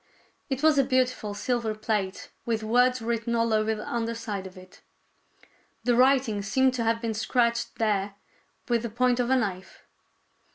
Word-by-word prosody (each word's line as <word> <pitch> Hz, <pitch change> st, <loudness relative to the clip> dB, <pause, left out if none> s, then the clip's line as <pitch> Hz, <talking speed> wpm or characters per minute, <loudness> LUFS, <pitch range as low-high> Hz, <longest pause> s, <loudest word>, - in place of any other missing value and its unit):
It 265 Hz, +1 st, -3 dB
was 310 Hz, -2 st, +5 dB
a -, -, +5 dB
beautiful 255 Hz, -5 st, 0 dB
silver 225 Hz, 0 st, -1 dB
plate, 210 Hz, -3 st, -3 dB
with 225 Hz, -2 st, -2 dB
words 245 Hz, +2 st, +2 dB
written 235 Hz, 0 st, -1 dB
all 230 Hz, -1 st, +1 dB
over 215 Hz, 0 st, +1 dB
the 210 Hz, -, -8 dB
under 230 Hz, -1 st, -2 dB
side 205 Hz, -4 st, -5 dB
of 185 Hz, 0 st, -14 dB
it. 185 Hz, 0 st, -15 dB, 1.0 s
The 245 Hz, -1 st, +2 dB
writing 255 Hz, -4 st, +3 dB
seemed 260 Hz, +5 st, +2 dB
to 245 Hz, -2 st, -1 dB
have 230 Hz, 0 st, +1 dB
been 230 Hz, -2 st, -2 dB
scratched 235 Hz, +2 st, 0 dB
there 205 Hz, -2 st, 0 dB, 0.5 s
with 235 Hz, -2 st, +1 dB
the 235 Hz, -, -4 dB
point 250 Hz, +2 st, +1 dB
of 245 Hz, 0 st, 0 dB
a 265 Hz, -, +4 dB
knife. 195 Hz, -6 st, -3 dB
230 Hz, 170 wpm, -26 LUFS, 215-250 Hz, 1.0 s, was